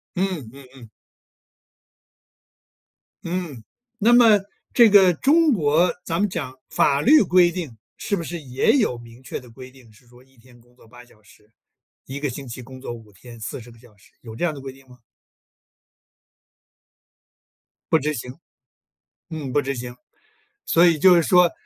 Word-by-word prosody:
嗯 180 - -3
嗯 135 -1 -14
嗯。 120 -4 -14 2.3
嗯， 170 -9 -5 0.3
那 230 +3 +3
么 230 -4 +6 0.3
这 235 -3 +6
个 195 -3 +6
中 310 - +3
国 165 - +2
咱 165 - -2
们 205 0 +1
讲 145 -8 -5 0.2
法 140 0 +1
律 300 - +6
规 180 -2 +3
定 160 -11 -7 0.2
是 200 - -2
不 170 - -5
是 170 +1 -6
也 130 -2 0
有 215 - 0
明 120 +1 -15
确 130 - -7
的 125 - -16
规 130 +2 -12
定， 130 -4 -20
是 115 +3 -24
说 120 +1 -20
一 130 0 -29
天 120 +1 -21
工 120 +1 -27
作 120 - -21
8 120 +2 -15
小 115 -3 -24
时， 105 0 -24 0.5
一 135 - -7
个 145 0 -2
星 135 +2 -8
期 125 +2 -8
工 130 +1 -12
作 130 -2 -7
5 110 -3 -13
天 115 +5 -14
40 115 +2 -8
个 115 - -18
小 115 -2 -21
时， 100 - -25
有 110 -2 -11
这 175 - -1
样 165 - -1
的 140 - -10
规 135 0 -8
定 135 0 -20
吗？ 125 0 -17 2.9
不 160 - +5
执 150 0 -2
行。 125 0 -8 1.0
嗯， 145 -5 -6
不 145 - +1
执 140 0 -3
行， 120 0 -7 0.7
所 170 +1 +4
以 165 -3 +3
就 185 +3 +6
是 170 - +3
说， 180 0 +4
135 Hz, 175 characters per minute, -22 LUFS, 120-175 Hz, 2.9 s, 么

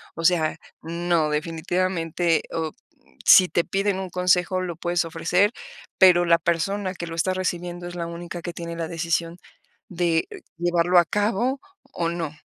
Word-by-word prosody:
O 165 - -6
sea, 165 -2 +2 0.2
no, 170 -1 0
definitivamente, 165 +1 -1
o, 160 -1 -2
mm, - - -36 0.2
si 185 - +8
te 170 - +1
piden 195 0 0
un 190 -1 -5
consejo, 180 +1 +1
lo 175 -2 -4
puedes 175 +1 0
ofrecer, 170 +5 +1 0.5
pero 180 -2 +6
la 170 -1 +5
persona 185 +4 -1
que 170 -2 -6
lo 165 - -6
está 180 +3 0
recibiendo 175 -1 -3
es 175 - -8
la 170 -1 -3
única 170 +1 -7
que 175 0 -6
tiene 170 0 -6
la 165 -1 -3
decisión 170 0 -2 0.5
de 170 -2 0 0.3
llevarlo 175 +1 +3
a 175 - +3
cabo, 220 +8 0 0.3
o 170 - -1
no. 170 -3 -3
175 Hz, 165 wpm, -24 LUFS, 165-185 Hz, 0.5 s, si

